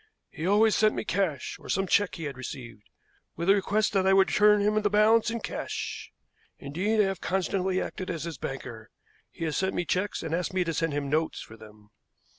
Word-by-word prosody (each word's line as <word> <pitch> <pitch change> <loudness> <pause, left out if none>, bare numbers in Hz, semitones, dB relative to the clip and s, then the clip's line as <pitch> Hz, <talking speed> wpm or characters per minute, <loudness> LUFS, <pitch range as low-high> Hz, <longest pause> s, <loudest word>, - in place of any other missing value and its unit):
He 160 - -4
always 210 +2 +4
sent 215 0 +3
me - - -3
cash, 180 -10 -1
or - - -13
some 195 +1 +1
check 200 +1 +2
he 165 - -7
had 140 -3 -4
received, 120 -4 -9 0.5
with 170 +4 +2
a - - +8
request 205 +2 +1
that 190 -1 +2
I 190 - +5
would 195 0 +5
return 210 0 +5
him 210 +1 +2
the 205 - +1
balance 215 +3 +4
in 230 0 -3
cash. - - -5 0.5
Indeed, 190 +10 -1
I - - +6
have 195 -2 -2
constantly 185 0 0
acted 185 - -5
as 165 -4 -3
his 165 -1 -6
banker. 120 -5 -7 0.4
He 165 - -6
has 155 - -2
sent 190 0 0
me 175 - -1
checks 185 +2 -1
and 160 0 -4
asked 180 +2 -2
me 185 - +2
to 165 -1 -2
send 165 -1 -1
him 145 -1 -2
notes 155 +3 0
for 110 - -10
them." 105 -1 -16
185 Hz, 220 wpm, -27 LUFS, 150-205 Hz, 0.5 s, a